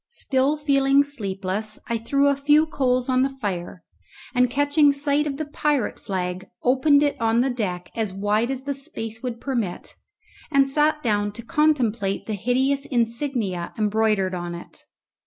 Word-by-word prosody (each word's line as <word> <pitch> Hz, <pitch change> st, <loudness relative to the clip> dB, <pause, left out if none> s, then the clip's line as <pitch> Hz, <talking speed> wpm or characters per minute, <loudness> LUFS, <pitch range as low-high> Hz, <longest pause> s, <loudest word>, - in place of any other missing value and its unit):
Still 275 Hz, -, 0 dB
feeling 280 Hz, -1 st, +3 dB
sleepless, 210 Hz, -5 st, -4 dB
I 235 Hz, -1 st, -1 dB
threw 275 Hz, +5 st, +2 dB
a 280 Hz, -, +3 dB
few 295 Hz, +3 st, +4 dB
coals 255 Hz, -5 st, 0 dB
on 255 Hz, -1 st, +2 dB
the 270 Hz, -, +2 dB
fire, 180 Hz, -6 st, -4 dB, 0.5 s
and 250 Hz, -1 st, +3 dB
catching 285 Hz, +2 st, +3 dB
sight 285 Hz, +1 st, 0 dB
of 275 Hz, -2 st, -3 dB
the 310 Hz, -, -3 dB
pirate 295 Hz, -3 st, -1 dB
flag 185 Hz, -2 st, -4 dB, 0.2 s
opened 280 Hz, +3 st, +4 dB
it 290 Hz, -4 st, -1 dB
on 225 Hz, +1 st, +3 dB
the 265 Hz, +1 st, +1 dB
deck 185 Hz, -7 st, -4 dB
as 220 Hz, -3 st, -1 dB
wide 205 Hz, +4 st, 0 dB
as 265 Hz, -1 st, -4 dB
the 280 Hz, +1 st, -2 dB
space 225 Hz, -5 st, -5 dB
would 245 Hz, -3 st, -4 dB
permit, 235 Hz, -10 st, -3 dB, 0.6 s
and 275 Hz, -2 st, +4 dB
sat 300 Hz, +2 st, +1 dB
down 205 Hz, -3 st, +1 dB
to 235 Hz, -, -9 dB
contemplate 245 Hz, -10 st, +1 dB
the 220 Hz, -, -3 dB
hideous 260 Hz, +7 st, 0 dB
insignia 235 Hz, -7 st, -1 dB
embroidered 210 Hz, -3 st, +1 dB
on 175 Hz, -1 st, -4 dB
it. 170 Hz, -, -12 dB
250 Hz, 160 wpm, -23 LUFS, 210-280 Hz, 0.6 s, few